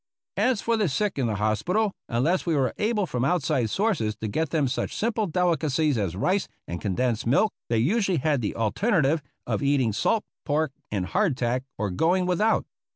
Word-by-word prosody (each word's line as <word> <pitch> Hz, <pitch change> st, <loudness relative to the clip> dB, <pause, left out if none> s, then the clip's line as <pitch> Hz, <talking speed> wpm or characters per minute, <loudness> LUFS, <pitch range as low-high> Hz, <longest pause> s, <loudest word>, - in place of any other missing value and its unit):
As 250 Hz, -5 st, +2 dB
for 230 Hz, 0 st, +1 dB
the 210 Hz, -6 st, +1 dB
sick 190 Hz, +3 st, -1 dB
in 125 Hz, -, +1 dB
the 110 Hz, -, -1 dB
hospital, 110 Hz, -, +1 dB, 0.2 s
unless 140 Hz, +10 st, +1 dB
we 165 Hz, -3 st, 0 dB
were 135 Hz, -3 st, +1 dB
able 210 Hz, -2 st, +1 dB
from 125 Hz, -7 st, -2 dB
outside 135 Hz, -7 st, +1 dB
sources 165 Hz, -, 0 dB
to 110 Hz, -, -5 dB
get 155 Hz, +9 st, -1 dB
them 150 Hz, -3 st, +1 dB
such 125 Hz, -, -2 dB
simple 220 Hz, -1 st, 0 dB
delicacies 155 Hz, -4 st, +1 dB
as 95 Hz, -6 st, -1 dB
rice 185 Hz, -, +1 dB, 0.2 s
and 85 Hz, 0 st, -5 dB
condensed 115 Hz, +4 st, -1 dB
milk, 175 Hz, -, +3 dB, 0.2 s
they 115 Hz, -, +2 dB
usually 190 Hz, -, +2 dB
had 145 Hz, -2 st, +1 dB
the 105 Hz, -, -2 dB
alternative 150 Hz, -, +1 dB, 0.2 s
of -, -, -1 dB
eating 140 Hz, -6 st, +2 dB
salt 215 Hz, -, +1 dB, 0.2 s
pork 155 Hz, 0 st, 0 dB, 0.2 s
and 100 Hz, -3 st, -1 dB
hardtack 130 Hz, -, 0 dB
or 100 Hz, -1 st, -1 dB
going 175 Hz, -, +2 dB
without. 195 Hz, +5 st, +2 dB
150 Hz, 180 wpm, -26 LUFS, 115-190 Hz, 0.2 s, milk